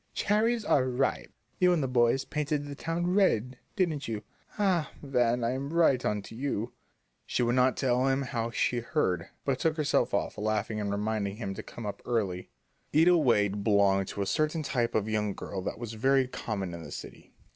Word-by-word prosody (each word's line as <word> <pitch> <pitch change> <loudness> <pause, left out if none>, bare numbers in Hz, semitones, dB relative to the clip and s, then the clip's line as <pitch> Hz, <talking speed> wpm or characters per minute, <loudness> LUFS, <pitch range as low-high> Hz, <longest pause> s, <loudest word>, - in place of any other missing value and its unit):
'Cherries 220 +2 +1
are 130 -8 +3
ripe!' 130 +2 -1 0.3
You 180 -1 +5
and 160 -5 +1
the - - 0
boys 125 +1 +2
painted 150 -1 -2
the 145 - -6
town 170 +4 -2
red, 130 - +2 0.2
didn't 160 -7 0
you? 110 -2 -4 0.3
Ah, 185 -7 +2
Van, 125 -3 +1
I'm 130 +4 -2
right 160 -7 +3
on 105 -1 -1
to - - -11
you!" 120 -2 -2 0.5
She - - 0
would 120 0 +2
not 130 0 +3
tell 130 0 +2
him 135 +1 +1
how 115 -3 -2
she 120 +1 0
heard, 105 - -1 0.2
but 135 -2 0
took 160 -1 +1
herself 150 -2 +1
off, - - -1
laughing 110 0 -1
and 100 - -2
reminding 100 0 -1
him 100 -3 -4
to - - -6
come 115 - -9
up 100 - -5
early. 100 -7 -2 0.5
Ida 170 +3 +6
Wade 105 - +2
belonged 100 -2 +3
to 100 - -3
a - - -3
certain 155 - 0
type 120 -4 -1
of 110 -1 +1
young 105 -2 -1
girl 95 - -5
that 95 - -4
was 115 -1 -6
very 135 +3 +2
common 100 -7 -4
in 85 - -7
the - - -9
city. - - -10
125 Hz, 195 wpm, -29 LUFS, 105-145 Hz, 0.5 s, Ida